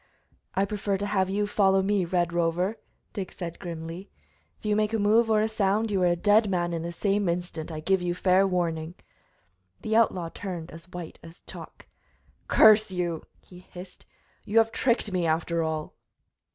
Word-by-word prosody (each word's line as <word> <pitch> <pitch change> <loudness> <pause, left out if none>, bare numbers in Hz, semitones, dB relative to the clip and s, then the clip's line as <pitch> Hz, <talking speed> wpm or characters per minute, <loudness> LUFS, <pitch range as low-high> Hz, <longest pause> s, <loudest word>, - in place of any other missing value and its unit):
"I 195 - +2
prefer 200 -1 -2
to 200 - -3
have 190 -2 0
you 205 +2 0
follow 195 -2 +2
me, 200 -2 +1
Red 175 -1 0
Rover!" 175 +5 0 0.3
Dick 195 -4 -5
said 170 -2 -7
grimly. 170 +1 -7 0.5
"If - - -19
you 210 -1 +2
make 215 +1 0
a - - +2
move 220 +2 +3
or 215 -1 +3
a 215 - +2
sound 215 0 0
you 195 -2 +1
are 180 - +4
a 175 - +2
dead 205 +4 +3
man 175 -2 -1
in 165 - -2
the 170 +1 -4
same 200 +1 0
instant, 170 -2 -4
I 155 -1 -5
give 190 +3 +1
you 175 0 -1
fair 190 +1 +3
warning." 170 -2 -2 0.9
The 220 - -1
outlaw 185 -7 +2
turned 175 -4 -6
as 165 +2 -12
white 175 -2 -8
as 165 +2 -14
chalk. - - -11 0.6
"Curse 215 -1 +6
you!" 175 -3 -2 0.2
he 180 - -15
hissed. 180 0 -13 0.4
"You 215 - -2
have 225 0 +5
tricked 235 -4 0
me, 180 -2 0
after 165 +1 0
all!" 160 -1 -3
185 Hz, 185 wpm, -26 LUFS, 170-205 Hz, 0.9 s, Curse